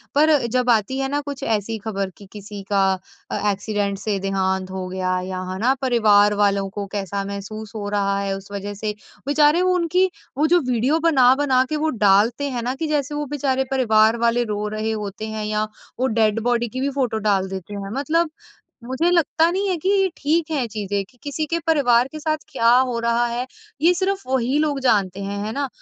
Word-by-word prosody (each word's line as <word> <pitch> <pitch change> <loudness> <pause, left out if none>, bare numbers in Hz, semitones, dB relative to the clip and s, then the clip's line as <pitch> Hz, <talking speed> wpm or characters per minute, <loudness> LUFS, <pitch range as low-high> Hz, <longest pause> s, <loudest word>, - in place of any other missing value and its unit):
पर 305 +1 +5 0.2
जब 250 -1 +2
आती 230 +3 +2
है 270 - 0
ना 290 +1 -1
कुछ 280 -1 -7
ऐसी 220 0 -1
खबर 195 -3 -2
कि 200 - -13
किसी 205 -1 -8
का 200 -1 +3 0.5
अ, - - -1
एक्सीडेंट 200 0 -2
से 205 -1 -1
देहांत 190 -1 -1
हो 185 -1 -4
गया 185 0 -1
या 185 -1 -4
है 185 - -4
ना? 255 +4 +3
परिवार 210 -5 +4
वालों 200 -1 +2
को 200 +1 -5
कैसा 200 0 -2
महसूस 200 +2 -6
हो 205 -1 -4
रहा 200 -1 0
है 195 -1 -1
उस 195 +1 -13
वजह 205 0 -5
से 210 -1 0 0.3
बेचारे 295 +3 +4
वो 365 0 +3
उनकी 360 +2 +2 0.3
वो 310 +2 +3
जो - - +5
वीडियो 260 +7 +2
बना-बना 260 -2 +4
के 310 - -1
वो - - +2 0.2
डालते 230 +8 +3
हैं 245 -2 -3
ना 250 +2 -2
कि 315 +3 -3
जैसे 295 -1 -1
वो 295 0 -2
बेचारे 265 -1 0
परिवार 220 -3 +4
वाले 240 +1 +2
रो 210 +1 -2
रहे 215 +1 -2
होते 210 0 -4
हैं 215 -1 -4
या 215 0 -1 0.3
वो 260 - +2
डेड 215 0 +3
बॉडी 240 0 +1
की 255 +4 -5
भी 280 - +1
फोटो 240 -4 0
डाल 190 -1 +2
देते 190 +1 -7
हैं 200 0 -5
मतलब 330 +3 +1 0.5
मुझे 260 +8 0
लगता 330 0 +3
नहीं 395 +2 -1
है 365 - +1
कि 380 - +2
ये 390 -1 +3
ठीक 315 +2 0
है 275 -5 0
चीज़ें 205 -2 -3
कि 250 - -26
किसी 290 +2 -2
के 335 +2 -1
परिवार 250 -6 +4
के 310 - -7
साथ 310 0 0
क्या 230 -3 +2
हो 255 -2 +1
रहा 235 +1 +1
है 240 +2 -3 0.4
ये 345 +2 +5
सिर्फ़ 385 +2 -1
वही 260 +1 +1
लोग 295 -3 0
जानते 200 -6 +1
हैं, 200 +1 -4
है 215 - -3
ना? 280 -1 -1
235 Hz, 210 wpm, -22 LUFS, 205-285 Hz, 0.5 s, पर